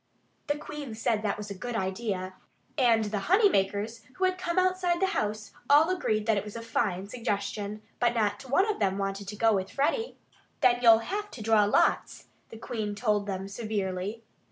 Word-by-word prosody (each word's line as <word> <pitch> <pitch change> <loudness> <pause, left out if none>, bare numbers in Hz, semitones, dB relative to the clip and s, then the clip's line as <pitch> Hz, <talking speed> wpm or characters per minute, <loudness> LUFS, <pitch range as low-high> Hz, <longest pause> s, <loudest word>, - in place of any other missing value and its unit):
The 290 - 0
Queen 295 -5 -7
said 225 0 +1
that - - -7
that 205 -2 -1
was 210 -1 -7
a - - -5
good 240 +5 -5
idea. 190 -2 -2 0.4
And 235 -5 +4
the 205 0 -2
honey 405 +2 +6
makers, 205 - -1
who 375 - -3
had 370 0 +3
come 345 -1 -2
outside 370 -1 +2
the 385 - +3
house, 210 0 -2 0.2
all 305 +5 +6
agreed 215 -13 0
that 220 -2 +2
it 200 - -1
was 210 +1 -9
a 230 - -6
fine 200 -4 -1
suggestion. 210 -2 -3 0.2
But 240 0 +2
not 225 +4 -1
one 375 - +3
of 430 - -1
them 195 -2 +1
wanted 195 0 -3
to 210 - -5
go 225 +1 +3
with 190 -1 -1
Freddie. 450 - -1 0.4
"Then 245 -3 +4
you'll 230 -2 +8
have 415 +2 -3
to 225 - -9
draw 220 -1 +4
lots," 205 - +1 0.2
the 225 - -10
Queen 215 -2 -4
told 210 -2 0
them 190 -1 -3
severely. 200 0 -3
220 Hz, 200 wpm, -28 LUFS, 205-270 Hz, 0.4 s, you'll